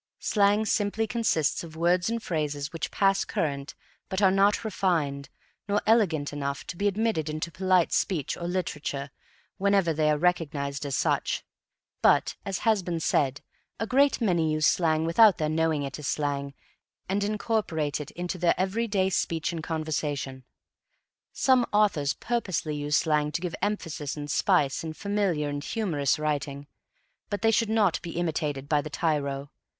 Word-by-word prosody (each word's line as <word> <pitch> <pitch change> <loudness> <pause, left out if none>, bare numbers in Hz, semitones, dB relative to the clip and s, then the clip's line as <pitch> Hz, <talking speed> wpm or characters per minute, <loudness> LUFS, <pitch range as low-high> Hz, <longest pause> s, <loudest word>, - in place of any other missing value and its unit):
Slang 205 +1 +2
simply 210 +1 0
consists 220 - 0
of 160 -1 -10
words 175 +3 +2
and 230 0 -2
phrases 150 -3 -2
which 165 -2 -3
pass 195 0 +2
current 140 -2 -3 0.3
but 190 - -1
are 195 -2 +5
not 200 +3 +3
refined, 160 -9 -1 0.4
nor 205 0 +2
elegant 175 -11 +2
enough, 140 -1 -3
to - - -6
be 200 +4 0
admitted 205 -6 0
into 155 +2 -3
polite 185 +1 +2
speech 165 -9 0
or 170 - -5
literature 150 -6 -3 0.5
whenever 195 -4 +3
they 155 0 +2
are 150 - +3
recognized 145 -4 -1
as 135 - -2
such. - - 0 0.6
But, - - +4
as 195 -1 -2
has 220 -3 +4
been 175 -2 -3
said, 140 -3 +1 0.4
a 225 - 0
great 275 +4 +3
many 170 -8 +1
use 155 0 +1
slang 160 -2 +2
without 195 +4 +6
their 155 -1 -1
knowing 160 -2 +1
it 140 +1 -5
as 145 - -5
slang 140 -1 -2 0.5
and 200 +2 0
incorporate 200 -8 -1
it 145 - -7
into 175 +1 -5
their 175 0 +2
everyday 195 0 0
speech 165 -2 0
and 165 - -4
conversation. 150 -5 -3 0.9
Some 260 -2 +3
authors 175 -9 +2
purposely 185 -10 -2
use 145 +1 +1
slang 150 -2 +1
to - - -2
give 180 -2 -3
emphasis 165 -9 -3
and 145 0 -5
spice 140 0 +2
in 160 -1 -4
familiar 195 -5 -1
and 145 0 -4
humorous 160 - 0
writing, 145 -2 -2 0.6
but 205 +1 -3
they 225 - +5
should 225 0 +2
not 215 -5 +2
be 170 -1 -6
imitated 150 -5 -2
by 150 -1 +2
the 155 - -7
tyro. 140 -3 -1
165 Hz, 160 wpm, -27 LUFS, 150-200 Hz, 0.9 s, without